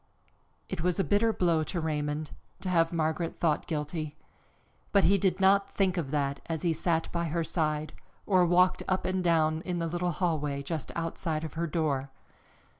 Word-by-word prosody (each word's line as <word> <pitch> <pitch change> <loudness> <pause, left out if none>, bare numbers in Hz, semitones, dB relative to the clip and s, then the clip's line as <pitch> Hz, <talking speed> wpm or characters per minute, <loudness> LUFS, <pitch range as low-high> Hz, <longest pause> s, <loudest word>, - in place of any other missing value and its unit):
It - - -4
was 180 +1 0
a - - +4
bitter 210 +3 +3
blow 170 -6 +2
to 175 - -3
Raymond, 150 -1 -2 0.3
to 185 - -3
have 165 -2 +3
Margaret 165 0 -1
thought 160 -3 +1
guilty, 155 0 -3 0.8
but 200 -1 +4
he 200 +1 +4
did 190 0 +1
not 195 +1 +3
think 190 -2 +2
of 165 -7 -2
that 140 -1 -1
as 165 0 -3
he 170 -2 +2
sat 165 0 0
by 170 0 -1
her 165 +1 -1
side, 155 -2 -1 0.3
or 185 -3 +4
walked 180 +1 +4
up 185 0 0
and 185 0 0
down 160 -2 +2
in 180 0 -3
the 165 - -1
little 175 +2 -1
hallway 150 -5 -1
just 155 +1 -4
outside 165 -1 -2
of 160 - -5
her 170 +1 -2
door. 145 -5 -1
165 Hz, 185 wpm, -29 LUFS, 155-180 Hz, 0.8 s, a